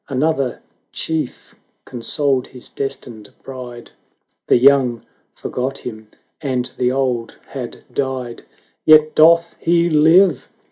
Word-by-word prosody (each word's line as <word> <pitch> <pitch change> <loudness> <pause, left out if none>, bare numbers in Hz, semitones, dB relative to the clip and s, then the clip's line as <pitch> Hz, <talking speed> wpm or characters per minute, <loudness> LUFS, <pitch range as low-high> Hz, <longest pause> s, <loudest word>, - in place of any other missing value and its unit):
Another 140 -2 -1 0.3
chief 155 -5 -4 0.3
consoled 130 +2 -1
his 125 - -7
destined 120 -6 -6
bride. 125 -3 -9 0.6
The - - +5
young 130 -2 +3 0.3
forgot 130 +2 -4
him, 110 -2 -8 0.3
and 130 -4 -1
the 125 0 +1
old 130 -3 -2
had 125 -3 -7
died; 130 -3 -3 0.4
"Yet 155 0 +6
doth 165 +1 +5
he 170 0 +2
live!" 160 +1 +4
135 Hz, 105 wpm, -19 LUFS, 125-155 Hz, 0.6 s, Yet